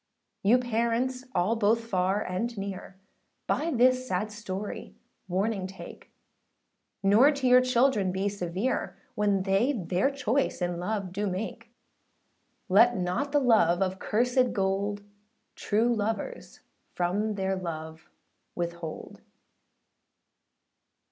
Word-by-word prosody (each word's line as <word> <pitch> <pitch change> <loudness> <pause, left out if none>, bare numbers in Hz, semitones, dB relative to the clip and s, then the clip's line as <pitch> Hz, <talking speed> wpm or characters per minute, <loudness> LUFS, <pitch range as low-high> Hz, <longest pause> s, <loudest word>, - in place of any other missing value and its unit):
You 220 +5 +5
parents 245 +1 -1
all 185 +6 +2
both 225 +1 +2
far 195 0 0
and 220 +6 -3
near, 195 -1 -6 0.5
By 320 +3 0
this 255 -2 +3
sad 210 +1 -1
story 205 -2 -6 0.3
warning 190 +1 -1
take; 190 0 -11 0.9
Nor 215 +9 +6
to 280 -2 -4
your 250 0 +7
children 250 -6 +2
be 190 +2 -1
severe, 195 +4 -2 0.2
When 205 -2 +1
they 200 +8 +2
their 185 +1 0
choice 275 -1 -1
in 175 -1 -2
love 195 0 -3
do 205 +2 -1
make; 220 +4 -5 1.0
Let 230 +6 +5
not 185 +11 -1
the 290 - +4
love 205 -9 +4
of 190 0 -3
cursèd 245 +3 +1
gold, 200 0 -1 0.5
True 225 +3 +1
lovers 205 - -4 0.3
from 205 +5 0
their 190 -1 -1
love 160 -3 -7 0.5
withhold. 170 -2 -5
205 Hz, 115 wpm, -28 LUFS, 185-235 Hz, 1.0 s, your